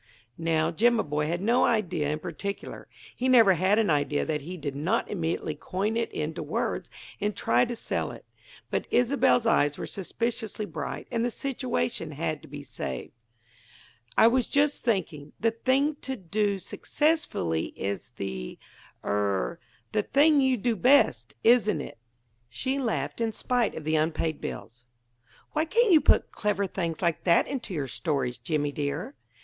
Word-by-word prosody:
Now 165 -1 +1
Jimaboy 165 -7 +2
had 175 +2 -1
no 235 +4 +3
idea 180 - +1
in 150 - -1
particular; 175 +5 -6 0.3
he 260 +1 0
never 230 -6 +7
had 185 +4 +2
an 220 -6 +3
idea 145 0 +1
that 150 -2 -1
he 180 +6 -7
did 145 -4 -4
not 175 +11 0
immediately 165 -4 -2
coin 195 +8 -2
it 230 0 -1
into 155 +1 -3
words - - -2 0.3
and 210 -1 -1
try 120 +2 +3
to 240 - -4
sell - - -2
it. - - -11 0.5
But - - -1
Isobel's 245 -1 +3
eyes 145 -9 +3
were - - -4
suspiciously 220 +2 -3
bright, 150 -6 -5
and 230 - 0
the 245 - +1
situation 230 - -2
had - - -2
to - - -14
be - - -8
saved. 65 -2 -5 1.1
"I - - +7
was 245 +1 +4
just 285 +1 +1
thinking: 160 - -1
the 225 0 +2
thing 270 +6 +1
to 265 -1 -4
do 200 0 -1
successfully 195 - 0
is 100 -1 -4
the 65 -1 -5 0.5
er 100 - 0 0.3
the 215 - +2
thing 290 +6 +4
you 260 -1 +3
do 235 +2 0
best, 170 - +3
isn't 225 -7 +4
it?" 140 - -8 0.5
She 270 +1 -2
laughed, 235 -2 -2
in 225 -1 0
spite 245 +1 0
of 160 - -6
the 155 +1 +1
unpaid 160 0 -1
bills. 115 +4 -7 0.7
"Why 310 - +1
can't 460 +6 +3
you 320 -3 +7
put - - +3
clever 210 -1 0
things 170 -3 -3
like 170 -3 +1
that 170 -2 +5
into 260 -6 -4
your 145 -3 -1
stories, 130 -3 -2
Jimmy, 150 -4 -1
dear?" 150 - -3
195 Hz, 160 wpm, -27 LUFS, 150-235 Hz, 1.1 s, never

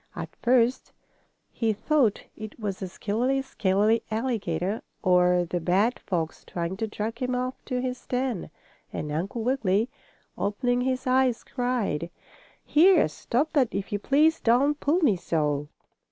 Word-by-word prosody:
At - - -7
first 245 +1 +2 0.6
he 225 -2 0
thought 240 0 +1
it 215 +1 -9
was 200 -3 -3
the 190 - -4
skillery 245 +9 -1
scalery 210 -1 +1
alligator, 215 -5 -1 0.2
or 180 -2 +4
the 175 +1 -2
bad 195 +8 +1
fox 165 -4 -3
trying 170 +1 -4
to 225 +1 -2
drag 220 +2 -4
him 250 -1 -1
off 255 +1 -3
to 250 -2 -2
his 255 -1 -4
den, 250 -5 -2 0.4
and 150 - -4
Uncle 190 +9 -3
Wiggily, 225 -3 +1 0.5
opening 245 +5 0
his 255 0 -1
eyes, 255 -2 +2
cried: 245 - -2 0.6
"Here! 345 - +5
Stop 250 - -2
that 270 -7 +3
if 195 0 -3
you 205 - -1
please! 305 +8 +3
Don't 275 +6 +3
pull 315 +6 +1
me 230 - +3
so!" 150 -4 -1
230 Hz, 145 wpm, -26 LUFS, 190-255 Hz, 0.6 s, Here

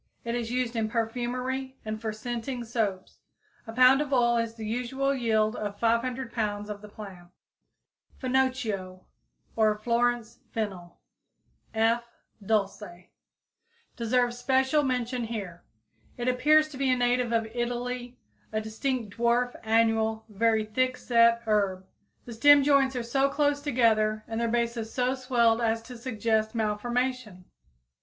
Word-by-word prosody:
It 235 - -2
is 235 -1 -2
used 250 -1 -1
in 220 -1 0
perfumery 250 +3 -3
and 215 0 -4
for 220 -1 -2
scenting 240 +3 -4
soaps. 220 -5 -3 0.5
A - - -5
pound 255 +4 +6
of 295 -2 -4
oil 240 -2 +3
is 230 -1 -2
the 220 -1 -7
usual 250 +5 -1
yield 220 -3 +1
of 205 -1 -4
500 235 +2 0
pounds 210 -2 -2
of 205 -1 -7
the 210 - -11
plant. 195 -4 -11 0.9
=Finocchio=, 245 -8 -1 0.5
or 215 -1 +3
=Florence 235 +1 0
fennel= 190 -6 -5 0.8
(F. 225 +2 +2 0.4
dulce, 200 -1 0
D. 210 - -7
C.), 175 +1 -16 0.9
deserves 245 +1 0
special 265 +3 +2
mention 250 -2 -1
here. 200 -7 -6 0.5
It 240 0 -3
appears 305 +5 +4
to 285 - -10
be 270 -1 +1
a 255 - +3
native 245 0 +1
of 225 -1 +1
Italy, 245 +1 -3 0.3
a 215 - 0
distinct 220 -1 -3
dwarf 240 +1 +2
annual, 220 0 +1
very 220 +1 +1
thick 255 +4 0
set 235 -1 +3
herb. 200 -4 0 0.4
The 240 - -8
stem 290 +4 +6
joints 275 -2 +3
are 245 - -2
so 270 +4 +1
close 290 0 +1
together 220 -6 +2
and 225 +1 -3
their 235 - +1
bases 235 -1 -1
so 250 0 0
swelled 240 -3 +2
as 225 0 0
to 250 +1 -10
suggest 225 -2 -1
malformation. 225 -2 -2
235 Hz, 145 wpm, -27 LUFS, 220-250 Hz, 0.9 s, pound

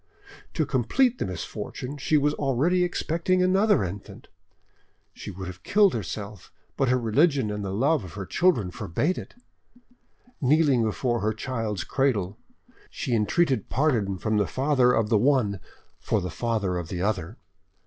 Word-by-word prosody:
To 155 - +1
complete 225 - +1
the - - -1
misfortune, 125 - -6
she 150 +2 +2
was 145 0 +2
already 150 +7 +1
expecting 175 +1 0
another 190 - +3
infant. 95 +2 -8 0.8
She - - -9
would 95 -1 -7
have 90 0 -8
killed 200 - +3
herself, 105 -1 -6 0.2
but 135 - +1
her 130 - +3
religion 125 0 +2
and 105 0 -4
the 100 - -3
love 135 +7 +1
of 90 - -10
her 100 -2 -6
children 110 - +1
forbade 145 - -1
it. - - -11 1.1
Kneeling 140 -2 +3
before 120 +2 0
her 110 +1 0
child's 110 -4 -3
cradle, 105 -6 -1 0.5
she 130 - -4
entreated 120 - +1
pardon 115 -9 +1
from 110 +3 -1
the 100 -3 +1
father 130 -2 +2
of 115 -3 +1
the 110 -3 +3
one 120 -6 +2 0.4
for 110 - 0
the 90 -2 -4
father 105 -2 -1
of 85 - -6
the 90 -1 -3
other. 100 0 -2
120 Hz, 155 wpm, -26 LUFS, 100-145 Hz, 1.1 s, another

